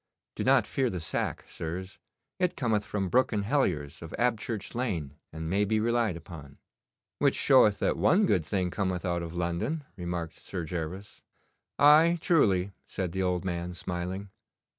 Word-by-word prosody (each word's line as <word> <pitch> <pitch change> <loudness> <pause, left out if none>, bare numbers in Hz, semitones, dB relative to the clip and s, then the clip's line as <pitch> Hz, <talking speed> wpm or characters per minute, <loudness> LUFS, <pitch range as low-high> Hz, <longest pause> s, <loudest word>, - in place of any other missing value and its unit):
Do - - -3
not - - +4
fear 130 -2 0
the 90 - -4
sack, 80 - -2
sirs. 90 +4 -6 0.4
It 180 -1 0
cometh 110 -5 +1
from 100 -2 -2
Brooke 130 +9 +3
and 105 -2 0
Hellier's 90 - 0
of 80 - -7
Abchurch 115 -3 -1
Lane, 90 - -2 0.2
and 80 +1 -5
may 100 +5 +2
be 110 +1 +1
relied 115 -4 +1
upon.' 80 -4 -11 0.6
'Which - - +3
showeth 125 -7 +5
that - - 0
one 200 +4 +4
good 90 - +2
thing 90 +2 -1
cometh 95 -3 -2
out 85 -1 0
of 85 0 -6
London,' 90 - -2
remarked 85 -3 -4
Sir 90 -4 -6
Gervas. 90 +4 -6 0.6
'Aye, 155 +4 +6
truly,' 100 - +3 0.2
said 95 -3 -3
the 95 +2 -2
old 90 0 0
man, 90 -1 -3
smiling. 90 +2 -4
95 Hz, 160 wpm, -29 LUFS, 85-115 Hz, 0.6 s, Aye